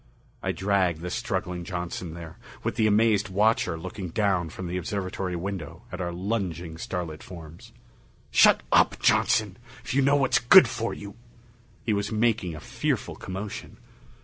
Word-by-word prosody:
I - - -1
dragged 95 -4 +1
the 90 0 -4
struggling 90 -1 -2
Johnson 85 -1 -5
there, 85 -2 -10 0.2
with - - -1
the 110 0 +2
amazed 105 -1 +3
watcher 105 -1 +2
looking 95 +2 -6
down 95 -3 +1
from 90 +3 -7
the 90 +1 -4
observatory 95 0 -3
window 90 -3 -5
at 90 - -5
our 85 0 -2
lunging 90 -4 -3
starlit 85 -4 -4
forms. 85 -3 -11 0.6
"Shut - - +6
up, - - +4
Johnson! 105 -3 +2 0.3
If - - -4
you 140 - +3
know 140 +1 +4
what's 130 -3 +3
good 125 +10 +8
for 115 -1 -3
you 100 -1 -8 0.4
" 120 +1 -30
He 110 - +2
was 100 +1 -1
making 110 -6 +1
a - - -7
fearful - - -2
commotion. 95 +2 -7
95 Hz, 160 wpm, -26 LUFS, 85-110 Hz, 0.6 s, good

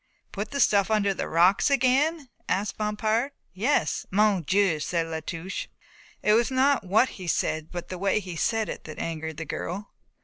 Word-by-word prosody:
"Put 210 +1 -4
the 280 - -4
stuff 200 -6 +4
under 205 -2 +2
the - - -4
rocks 180 - +4
again?" 275 +2 +2 0.2
asked 195 +3 0
Bompard. 215 +5 0 0.2
"Yes." 225 +11 0
"Mon 205 -1 +3
Dieu!" 190 -1 +2
said 165 +2 -1
La 160 -1 -4
Touche. 165 +4 -5 0.6
It 210 - +4
was 235 +3 +3
not 265 -1 +2
what 205 +7 +3
he 185 -3 -9
said 155 -1 -1
but 175 -1 -6
the 185 - -5
way 195 +2 +2
he 185 -4 -7
said 220 +6 0
it - - -7
that 155 - -8
angered 160 -2 -4
the 165 - -4
girl. 185 +7 -5
200 Hz, 180 wpm, -26 LUFS, 170-225 Hz, 0.6 s, stuff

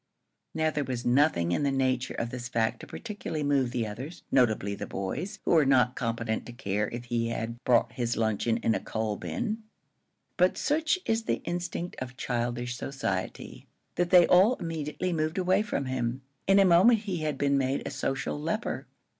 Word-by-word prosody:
Now 160 0 +2
there 150 -1 -1
was 125 -2 -4
nothing 120 - +3
in 90 - +1
the 140 - +2
nature 130 -2 0
of 115 0 -3
this 125 -1 -5
fact 115 -2 0
to - - -10
particularly 205 -8 -5
move 140 -3 +2
the 120 -2 -1
others 130 +11 -7
notably 110 -5 +2
the - - -5
boys, 150 - -4
who - - +1
were 160 -3 +6
not 125 -2 +3
competent 115 -2 -2
to 120 - -8
care 105 -4 -1
if 120 +1 -6
he 120 -1 -1
had 115 +1 -4
brought 120 -2 +3
his 120 -2 -2
luncheon 110 +1 +1
in 115 - +3
a 100 - 0
coal 110 0 -2
bin; 100 - -3 0.8
but 180 0 +3
such 310 +4 +1
is 225 0 0
the - - -1
instinct 175 0 -3
of 125 0 -7
childish 120 0 -2
society 100 -9 -4 0.3
that 175 0 0
they 175 -1 +8
all 195 +8 +5
immediately 165 +1 -3
moved 155 +1 -1
away 185 +2 +3
from 205 -10 -2
him. 130 0 -2 0.2
In 195 0 +6
a 195 - +7
moment 190 +6 +6
he 195 -5 -3
had 155 -3 -2
been 140 0 +2
made 135 0 0
a - - -4
social 135 +1 -2
leper. 215 +10 -2
135 Hz, 190 wpm, -28 LUFS, 120-170 Hz, 0.8 s, they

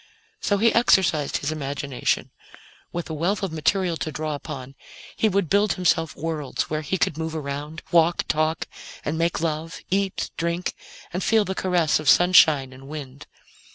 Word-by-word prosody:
So 205 - +1
he 225 +3 +3
exercised 185 -10 +3
his 145 - -2
imagination. 140 -3 -2 0.6
With 175 -1 -4
a - - -2
wealth 180 +7 -1
of 190 - -1
material 170 +2 +1
to 155 - -3
draw 155 +1 -3
upon, 140 -3 -7 0.4
he 220 - +2
would 200 -2 +1
build 200 +4 +3
himself 165 -4 +1
worlds 155 -3 -3
where 155 0 0
he 170 +5 -2
could 160 -3 0
move 160 0 -3
around, 150 +1 -5
walk, 170 0 +3
talk, 155 +1 0 0.4
and 150 - -1
make 165 0 0
love, 160 0 -3
eat, 195 0 0
drink 170 +2 -1 0.4
and 180 +1 -2
feel 220 -2 +3
the 190 - -2
caress 175 -5 +2
of 155 -2 +1
sunshine 155 -7 +6
and 135 +1 -13
wind. 140 -2 -8
160 Hz, 165 wpm, -24 LUFS, 150-180 Hz, 0.6 s, sunshine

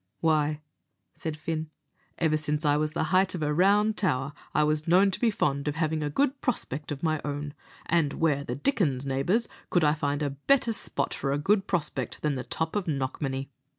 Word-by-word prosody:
"Why," 155 -2 +1 0.5
said 160 -2 -5
Fin, 155 0 -3 0.5
"ever 160 -2 +2
since 150 0 -1
I 145 0 +4
was 150 +1 0
the - - 0
height 185 0 +3
of 165 - -3
a 150 0 +1
round 205 +5 +3
tower, 135 -7 0 0.2
I 150 - +3
was 155 +1 0
known 190 +4 +5
to - - -3
be 235 - +3
fond 140 -8 0
of 150 - -1
having 160 -1 0
a 150 - -1
good 275 - 0
prospect 150 - -2
of 145 +1 -5
my 155 -2 +1
own; 145 0 -4 0.3
and 160 -4 +2
where 150 -4 +1
the 125 - -4
dickens, 145 - 0
neighbours, 140 - +1 0.2
could 175 - +2
I 150 -1 +4
find 145 -1 -1
a 145 - -1
better 230 - +2
spot - - -1
for 135 - -2
a 140 - +1
good 195 +6 +2
prospect 150 - -2
than 150 -1 +1
the 130 -2 -3
top 160 +2 -3
of 205 -4 -1
Knockmany? 135 -1 -2
155 Hz, 205 wpm, -28 LUFS, 145-175 Hz, 0.5 s, known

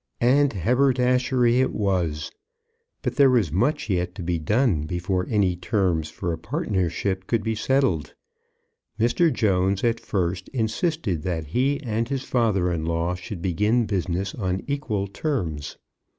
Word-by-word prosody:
And 135 +4 +4
haberdashery 125 - +2
it 130 - +1
was. 90 -7 -1 0.7
But - - -2
there 140 -2 +7
was 115 - +2
much 120 - +1
yet 90 -2 -1
to 95 - -6
be 85 -1 -1
done 95 - +1
before 90 +2 -1
any 100 -5 +2
terms 90 -4 0
for 85 0 -3
a 80 - -5
partnership 95 - -2
could 115 -3 0
be 110 - 0
settled. 110 - 0 0.8
Mr. 140 +9 +3
Jones 95 -4 +1
at 115 -1 +1
first 90 -2 -2
insisted 120 - -1
that 80 -2 -2
he 130 - 0
and 115 0 -1
his 135 -1 -2
father 105 -9 +1
in 80 -2 -2
law 85 +2 -1
should 90 0 -7
begin 105 +6 +2
business 95 -1 -2
on 95 -3 -2
equal 140 -9 -2
terms. 95 - -3
100 Hz, 145 wpm, -24 LUFS, 90-125 Hz, 0.8 s, there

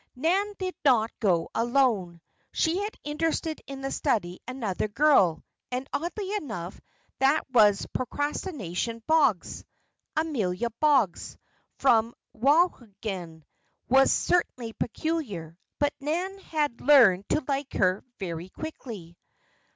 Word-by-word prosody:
Nan 380 +9 +1
did 370 -1 -3
not 235 -5 +4
go 180 -6 +1
alone. 230 -8 +1 0.3
She 335 +3 +1
had 415 +1 -4
interested 315 +1 -2
in 275 -1 -7
the 270 0 -3
study 195 - -1
another 225 -7 -2
girl, 210 - +3 0.3
and 255 +2 -3
oddly 380 +5 -3
enough 205 - -6 0.4
that 275 +4 +3
was 210 -5 +5
"Procrastination 240 - -3
Boggs." 305 - +2 0.5
Amelia 235 - -1
Boggs, 275 - +2 0.4
from 235 -3 +3 0.2
Wauhegan, 215 - 0 0.5
was 270 +2 +5
certainly 250 -10 0
peculiar; 225 - -3 0.2
but 290 0 +1
Nan 355 +7 -2
had 300 -9 -2
learned 235 -10 +6
to 305 - 0
like 275 -1 -2
her 185 +1 +1
very 175 -2 -5
quickly. 215 - -8
255 Hz, 110 wpm, -27 LUFS, 200-305 Hz, 0.5 s, learned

